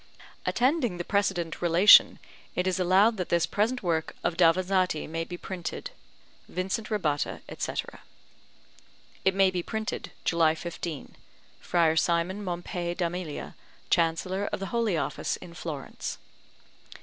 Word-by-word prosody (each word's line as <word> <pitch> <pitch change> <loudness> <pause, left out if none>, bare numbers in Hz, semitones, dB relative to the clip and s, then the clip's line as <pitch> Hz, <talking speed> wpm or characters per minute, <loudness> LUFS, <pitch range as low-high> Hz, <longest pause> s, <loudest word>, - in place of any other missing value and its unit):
Attending 250 - +1
the 175 - -3
precedent 190 -5 -1
relation, 175 +4 +7 0.4
it 180 - 0
is 185 0 0
allowed 195 +5 +4
that 180 - -3
this 170 -1 +3
present 230 +4 0
work 165 -3 -1
of 175 - 0
Davanzati 180 0 +2
may 165 +1 -3
be 175 +1 -7
printed. 175 -1 -6 0.6
VINCENT 190 +4 -3
RABBATTA, 155 -10 -1
etc. - - -4 1.2
It 190 0 +2
may 195 -1 +4
be 180 -1 -1
printed, 220 +4 -4
July 165 -2 +3
15. 165 -2 -6 0.4
FRIAR 165 -2 +2
SIMON 170 +5 +1
MOMPEI 175 -1 -3
D'AMELIA, 175 -3 -4 0.4
Chancellor 185 +4 +1
of - - -2
the 195 - -5
Holy 230 -7 +1
Office 140 -1 -2
in 170 - -11
Florence. 155 -5 -6
180 Hz, 125 wpm, -28 LUFS, 170-195 Hz, 1.2 s, relation